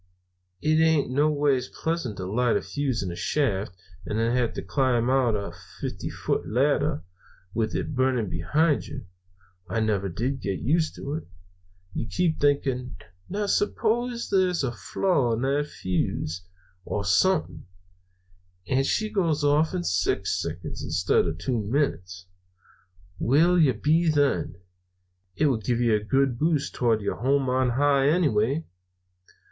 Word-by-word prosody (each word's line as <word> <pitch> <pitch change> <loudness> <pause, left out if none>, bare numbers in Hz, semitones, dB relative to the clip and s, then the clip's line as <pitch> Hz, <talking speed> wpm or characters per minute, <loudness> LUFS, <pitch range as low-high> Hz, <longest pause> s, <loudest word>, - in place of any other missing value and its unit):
"It 155 +1 +3
ain't 160 -5 +3
noways 145 -2 +2
pleasant 160 - -3
to 95 - -4
light 115 +5 +1
a - - -2
fuse 135 -7 -2
in 90 - -3
a - - -6
shaft, 100 -8 -1 0.3
and 105 +5 -3
then 115 +2 +1
have 125 -2 +1
to - - -4
climb 125 +3 +1
out 130 -4 +2
a 100 -1 -3 0.3
fifty - - -4
foot - - -2
ladder, 145 +5 +1 0.5
with 110 -1 -1
it - - -2
burning 130 -4 +1
behind 145 - +1
you. 135 -5 -8 0.6
I 115 - -1
never 105 -3 0
did 125 +9 -2
get 100 -2 -2
used 160 +5 0
to 140 - -5
it. 160 - -5 0.7
You 115 - -3
keep 170 0 0
thinking, 135 -3 0 0.3
'Now, 205 +2 -2
suppose 235 +4 0
there's 185 -4 +2
a 130 - 0
flaw 135 0 0
in 115 +2 -2
that 140 +2 +1
fuse, 90 - -2 0.4
or 100 +2 -3
something, 185 - +1 1.0
and 135 +1 +2
she 215 - +1
goes 170 -8 0
off 150 +2 +2
in 85 - -1
six 90 +2 0
seconds - - -5
instead 85 +4 +1
of 80 -1 -3
two 115 +8 -1
minutes? 90 - -2 0.9
Where'll 165 +8 +4
you 135 -7 +4
be 160 +8 +2
then?' 145 -2 +1 0.8
It 155 - +1
would 125 -7 +1
give 120 +1 0
you 120 -2 +3
a 105 - +3
good 135 +1 +1
boost 155 -2 +1
towards 115 -4 +1
your 100 - -2
home 135 +2 +1
on 130 0 +2
high, 140 +2 +3
anyway. 145 -3 +2
130 Hz, 150 wpm, -26 LUFS, 110-150 Hz, 1.0 s, Where'll